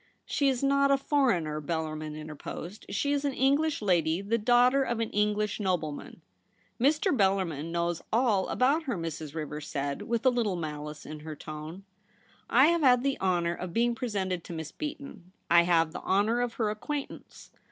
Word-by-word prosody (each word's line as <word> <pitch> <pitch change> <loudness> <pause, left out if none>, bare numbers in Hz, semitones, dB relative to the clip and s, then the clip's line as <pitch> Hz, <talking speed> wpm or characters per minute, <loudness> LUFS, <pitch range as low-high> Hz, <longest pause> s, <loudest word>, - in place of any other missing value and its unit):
* - - -46
She 280 -2 +1
is 260 0 -1
not 280 0 +3
a 275 - +5
foreigner,' 235 - +1
Bellarmin 155 -1 -3
inter 155 0 -7
posed. 175 +6 -8
' - - -16
She 285 +8 0
is 285 0 0
an 280 -2 -1
English 285 0 +2
lady, 170 -4 +2
the 210 +4 -1
daughter 245 +4 +4
of 240 -3 -1
an 230 - -2
English 210 0 0
nobleman.' 175 -7 -3 0.3
* - - -21
Mr. 300 +5 +3
Bellarmin 190 - 0
knows 170 0 -1
^// 225 -5 +2
about 280 +6 +2
her,' 245 -8 -2
Mrs. 160 -2 -5
Rivers 150 -1 -5
said, 140 -1 -3
with 235 +1 -2
a 260 - +6
little 230 -6 0
malice 150 -2 -6
in 155 0 -7
her 155 0 -7
tone. 155 +5 -8 0.4
' - - -33 0.2
I 260 +3 +6
have 340 -1 +2
had 250 -3 +5
the 275 -1 0
honour 175 -2 +1
of 175 0 -6
being 235 +1 +2
presented 195 -8 -2
to - - -7
Miss 160 -1 -6
Beaton; 280 - -7 0.2
I 170 0 +7
have 165 -2 +3
the - - -7
honour 215 +5 +2
of 245 -1 -1
her 215 -3 0
acquaintance. 280 +7 -6
200 Hz, 195 wpm, -29 LUFS, 160-255 Hz, 0.4 s, I